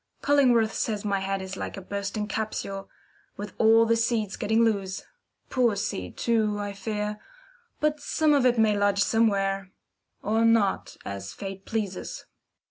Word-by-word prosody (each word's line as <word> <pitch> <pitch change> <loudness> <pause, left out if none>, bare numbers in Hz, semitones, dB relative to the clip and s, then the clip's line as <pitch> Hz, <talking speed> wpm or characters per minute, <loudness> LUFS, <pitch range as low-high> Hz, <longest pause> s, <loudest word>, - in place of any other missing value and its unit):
Cullingworth 250 -6 +4
says 215 -2 -2
my 200 -1 +1
head 195 0 -2
is 190 0 -6
like - - -5
a - - -6
bursting 200 +2 -3
capsule, 205 -2 -4 0.5
with 205 -1 -6
all 225 +1 +6
the 230 0 +3
seeds 230 -3 0
getting 220 +2 +2
loose. 195 -4 -1 0.5
Poor 240 -4 +3
seed, 95 - -4
too, 220 -3 +1
I 205 -1 -4
fear, 210 +1 -3 0.6
but 300 0 +1
some 305 +1 +2
of 280 -3 +3
it 245 -1 +3
may 220 -2 +4
lodge 205 0 +3
somewhere 195 -4 +1 0.5
or 220 +3 +2
not, 225 -4 +2
as 100 0 -6
Fate 195 - -7
pleases. 210 -4 -4
210 Hz, 150 wpm, -26 LUFS, 195-230 Hz, 0.6 s, all